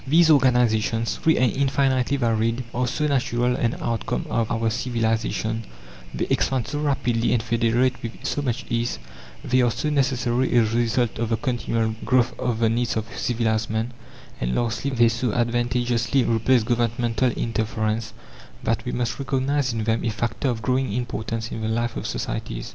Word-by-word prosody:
These 160 Hz, +3 st, +5 dB
organizations, 120 Hz, -4 st, +3 dB
free 160 Hz, -, +2 dB
and 125 Hz, -2 st, +2 dB
infinitely 135 Hz, -1 st, +1 dB
varied, 115 Hz, 0 st, +1 dB
are 125 Hz, +1 st, 0 dB
so 150 Hz, +5 st, -1 dB
natural 125 Hz, -3 st, +1 dB
an 120 Hz, -2 st, 0 dB
outcome 115 Hz, -2 st, -2 dB
of 115 Hz, -1 st, 0 dB
our 115 Hz, -1 st, 0 dB
civilization; 115 Hz, -1 st, -1 dB, 0.5 s
they -, -, -2 dB
expand 130 Hz, -3 st, +1 dB
so 145 Hz, -, -3 dB
rapidly 125 Hz, -6 st, +1 dB
and 115 Hz, -2 st, +1 dB
federate 120 Hz, +2 st, +1 dB
with 115 Hz, 0 st, -5 dB
so 145 Hz, -, -1 dB
much 125 Hz, -5 st, -2 dB
ease; 120 Hz, -, -1 dB, 0.5 s
they 130 Hz, +1 st, +3 dB
are 120 Hz, -, +3 dB
so 130 Hz, +6 st, -2 dB
necessary 130 Hz, -3 st, +1 dB
a 120 Hz, -, +6 dB
result 115 Hz, +1 st, 0 dB
of 115 Hz, -1 st, -1 dB
the 115 Hz, -, +1 dB
continual 115 Hz, -3 st, -1 dB
growth 125 Hz, 0 st, +2 dB
of 120 Hz, -3 st, -1 dB
the 115 Hz, 0 st, +2 dB
needs 120 Hz, +1 st, 0 dB
of 110 Hz, +1 st, -5 dB
civilized 115 Hz, -2 st, 0 dB
man; 110 Hz, +3 st, -2 dB, 0.5 s
and 60 Hz, +1 st, -1 dB
lastly, 120 Hz, +3 st, -1 dB
they 120 Hz, -3 st, +4 dB
so 115 Hz, 0 st, -1 dB
advantageously 120 Hz, +1 st, +1 dB
replace 115 Hz, +1 st, +3 dB
governmental 120 Hz, +1 st, +1 dB
interference, 110 Hz, 0 st, -2 dB, 0.5 s
that -, -, 0 dB
we -, -, -2 dB
must 120 Hz, +1 st, -2 dB
recognize 135 Hz, 0 st, 0 dB
in 115 Hz, -1 st, -2 dB
them 110 Hz, +1 st, 0 dB
a -, -, +1 dB
factor 120 Hz, +5 st, -2 dB
of 115 Hz, -3 st, -3 dB
growing 130 Hz, -1 st, +1 dB
importance 115 Hz, -1 st, -3 dB
in 110 Hz, -, -4 dB
the 110 Hz, -, -1 dB
life 115 Hz, +1 st, -1 dB
of -, -, -4 dB
societies. -, -, -4 dB
120 Hz, 170 wpm, -24 LUFS, 115-125 Hz, 0.5 s, a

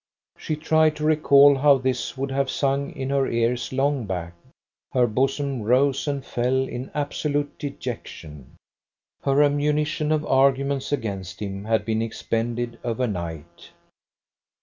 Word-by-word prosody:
She 155 Hz, -, -3 dB
tried 155 Hz, 0 st, +2 dB
to 150 Hz, -, -6 dB
recall 145 Hz, -2 st, +6 dB
how 140 Hz, 0 st, +5 dB
this 130 Hz, 0 st, -2 dB
would 135 Hz, +1 st, -3 dB
have 135 Hz, 0 st, 0 dB
sung 140 Hz, +1 st, 0 dB
in 135 Hz, 0 st, -4 dB
her 140 Hz, -1 st, +1 dB
cars 120 Hz, +1 st, 0 dB
long 135 Hz, -3 st, 0 dB
back. 85 Hz, -3 st, -4 dB, 0.6 s
Her 125 Hz, -2 st, +3 dB
bosom 135 Hz, +2 st, -1 dB
rose 135 Hz, +6 st, +2 dB
and 140 Hz, -2 st, -2 dB
fell 130 Hz, +2 st, 0 dB
in 125 Hz, +2 st, -6 dB
absolute 145 Hz, 0 st, -2 dB
dejection. 115 Hz, -, -7 dB, 0.7 s
Her 140 Hz, +1 st, +3 dB
ammunition 150 Hz, +2 st, +1 dB
of 155 Hz, -1 st, +1 dB
arguments 135 Hz, +1 st, +2 dB
against 100 Hz, -9 st, -4 dB
him 100 Hz, -1 st, -5 dB
had 110 Hz, 0 st, +1 dB
been 110 Hz, 0 st, 0 dB
expended 115 Hz, +1 st, -3 dB
overnight. 85 Hz, -, -4 dB
135 Hz, 130 wpm, -24 LUFS, 115-145 Hz, 0.7 s, recall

